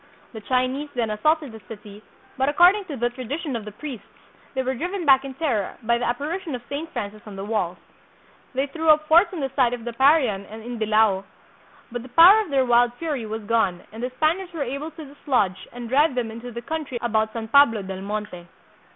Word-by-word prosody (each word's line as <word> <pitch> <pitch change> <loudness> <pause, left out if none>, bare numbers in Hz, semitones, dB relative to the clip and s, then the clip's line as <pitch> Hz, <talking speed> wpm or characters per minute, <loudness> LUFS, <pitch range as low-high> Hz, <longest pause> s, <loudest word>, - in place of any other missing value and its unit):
The 220 - -8
Chinese 255 +5 -1
then 230 -3 -1
assaulted 305 +6 +1
the 220 -1 -11
city, 210 -1 -11 0.3
but, 265 +1 +1
according 360 +7 +5
to 310 -6 -6
the 240 +1 0
tradition 260 +4 -4
of 225 -2 -5
the 210 - -7
priests, 250 -1 -8 0.5
they 260 - 0
were 260 +1 -1
driven 355 +7 -4
back 270 -2 +6
in 270 -1 -7
terror 255 - -1
by 235 +1 +2
the 245 - -1
apparition 305 +6 -3
of 245 - -8
Saint 300 +4 -4
Francis 210 +1 -5
on 205 - -9
the 195 +1 -6
walls. 195 -5 -1 0.8
They 270 +2 +1
threw 320 +3 -2
up 305 0 +5
forts 340 +6 +5
on 350 -5 -5
the 270 -1 -2
site 250 -3 +3
of 240 -2 -6
the 240 - -4
Parian 265 -6 +3
and 220 +1 -10
in 240 0 -6
Dilao, 215 -3 +3 0.7
but 245 0 -4
the 255 - -12
power 345 - +8
of 415 - -6
their 270 -2 +2
wild 240 0 +3
fury 285 -7 -3
was 220 0 -5
gone 205 -5 0
and 220 +2 -9
the 250 - -2
Spaniards 345 +6 0
were 315 -4 -2
able 280 +4 -4
to 315 -1 -10
dislodge 255 -9 -1
and 240 -1 -7
drive 280 +3 +3
them 235 -3 -2
into 230 +2 -8
the 235 +1 -7
country 305 -3 -4
about 220 -2 0
San 225 -1 -5
Pablo 230 -6 +5
del 190 0 -6
Monte. 205 -3 -5
245 Hz, 220 wpm, -23 LUFS, 220-295 Hz, 0.8 s, power